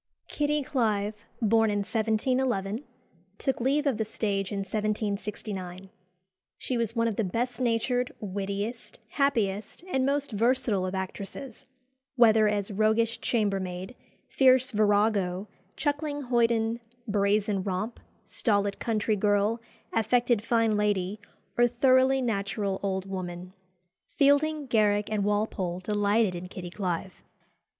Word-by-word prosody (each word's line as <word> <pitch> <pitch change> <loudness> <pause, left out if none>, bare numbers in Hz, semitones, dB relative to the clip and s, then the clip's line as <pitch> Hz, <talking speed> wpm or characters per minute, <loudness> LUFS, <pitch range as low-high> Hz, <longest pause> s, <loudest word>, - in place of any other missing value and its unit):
Kitty 295 0 0
Clive, 215 -4 -1 0.2
born 225 +1 +4
in 205 -1 0
1711, 220 +1 0 0.5
took 265 -3 -1
leave 280 +4 +2
of 270 -6 +1
the 220 - 0
stage 200 -3 -2
in 200 -1 -2
1769. 200 -2 -3 0.7
She 255 - -3
was 230 -1 -1
one 230 0 +2
of 220 - -2
the 225 - +2
best 235 +5 -2
natured, 245 +1 +1
wittiest, 200 +3 -4
happiest, 225 - 0
and 265 -8 0
most 280 0 0
versatile 225 -3 +1
of 185 - -4
actresses, 195 +7 -6 0.5
whether 220 -3 +6
as 205 -1 -1
"roguish 220 +3 +1
chambermaid, 195 -1 -1 0.3
fierce 260 -1 +4
virago, 205 -3 +2 0.3
chuckling 290 0 -2
hoyden, 235 -2 +1 0.3
brazen 205 -1 +1
romp, 195 +4 -3 0.3
stolid 205 -3 0
country 220 -1 0
girl, 205 +3 +1 0.3
affected 240 0 +2
fine 230 -1 +2
lady, 205 -1 0 0.4
or 240 - +6
thoroughly 260 +2 +3
natural 200 -3 -1
old 190 -1 -2
woman." 180 -1 -6 0.6
Fielding, 290 +1 +3
Garrick, 210 -3 +2
and 210 -2 0
Walpole 205 -4 -1
delighted 205 +1 +1
in 175 +1 -6
Kitty 180 -1 -8
Clive. 185 -1 -4
215 Hz, 120 wpm, -28 LUFS, 200-240 Hz, 0.7 s, whether